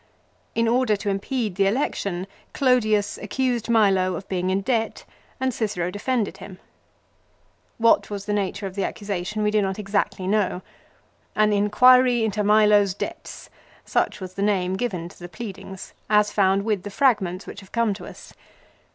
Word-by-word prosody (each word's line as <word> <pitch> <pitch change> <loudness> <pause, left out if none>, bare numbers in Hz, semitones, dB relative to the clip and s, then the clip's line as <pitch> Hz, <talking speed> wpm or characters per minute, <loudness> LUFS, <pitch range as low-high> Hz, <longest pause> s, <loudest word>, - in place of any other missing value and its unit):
In 230 0 +2
order 240 -2 +2
to 205 0 -3
impede 210 +2 -2
the 195 -1 +3
election 200 -5 -1 0.3
Clodius 215 -6 +2
accused 250 -4 -2
Milo 195 -5 +3
of 185 - -7
being 185 -1 -1
in 190 +1 +1
debt 225 +1 -1 0.3
and 260 -1 0
Cicero 180 -6 -2
defended 220 +2 -2
him. 190 -2 -10 1.2
What 230 0 +3
was 200 -1 -5
the 210 - -1
nature 200 0 -2
of 190 - -5
the 195 0 -2
accusation 205 +1 -3
we 210 - +2
do 215 0 +2
not 190 -1 -2
exactly 200 -2 -1
know. 190 -2 0 0.7
"An 215 0 +3
in 205 0 +1
quiry 250 +1 +5
into 210 -1 -1
Milo's 210 -2 +4
debts! - - -7 0.2
" - - -28
Such - - 0
was 185 -1 -7
the 195 - -5
name 190 -3 +1
given 190 -6 -3
to - - -16
the 175 0 -9
pleadings 195 0 -8 0.2
as 210 -1 +3
found 195 -1 +2
with 210 -4 0
the 205 - -7
fragments 200 -6 +1
which - - -9
have 195 -2 -16
come 230 -3 +1
to 195 - -9
us. - - -12
205 Hz, 170 wpm, -23 LUFS, 190-220 Hz, 1.2 s, quiry